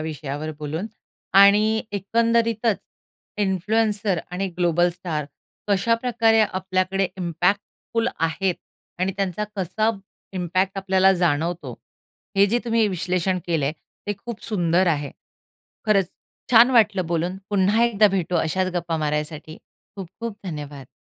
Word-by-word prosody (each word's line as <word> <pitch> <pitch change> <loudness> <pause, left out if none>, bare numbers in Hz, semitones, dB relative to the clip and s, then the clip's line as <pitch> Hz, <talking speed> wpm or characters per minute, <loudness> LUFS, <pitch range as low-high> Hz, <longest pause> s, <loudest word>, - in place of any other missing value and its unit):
विषयावर 155 -1 -4
बोलून 155 +7 -4 0.5
आणि 210 +2 +5
एकंदरीतच 230 +2 +1 0.6
इन्फ्लुएन्सर 205 0 +1
आणि 190 +2 -2
ग्लोबल 175 0 +3
स्टार 170 -4 -4 0.4
कशाप्रकारे 230 +2 +2
आपल्याकडे 185 -1 0
इम्पॅक्टफुल 190 +6 -1
आहेत 175 +3 0 0.4
आणि 190 +1 0
त्यांचा 195 +1 -1
कसा 195 +4 0 0.4
इम्पॅक्ट 185 +2 -1
आपल्याला 190 0 +4
जाणवतो, 170 -1 0 0.6
हे 200 +1 +6
जे 235 +4 +1
तुम्ही 230 -2 +2
विश्लेषण 185 0 -1
केलंय 155 -4 0 0.3
ते 205 - 0
खूप 235 -2 -7
सुंदर 180 -3 +1
आहे. 145 -4 0 0.8
खरंच 195 -4 +3 0.4
छान 240 +1 +7
वाटलं 210 -7 +3
बोलून. 175 +2 -1
पुन्हा 205 +3 +3
एकदा 215 -3 +4
भेटू 180 -2 -1
अशाच 185 +3 0
गप्पा 170 -1 -1
मारायसाठी. 150 +1 -3 0.4
खूप-खूप 200 +4 -7
धन्यवाद. 145 -5 -7
190 Hz, 110 wpm, -23 LUFS, 170-210 Hz, 0.8 s, छान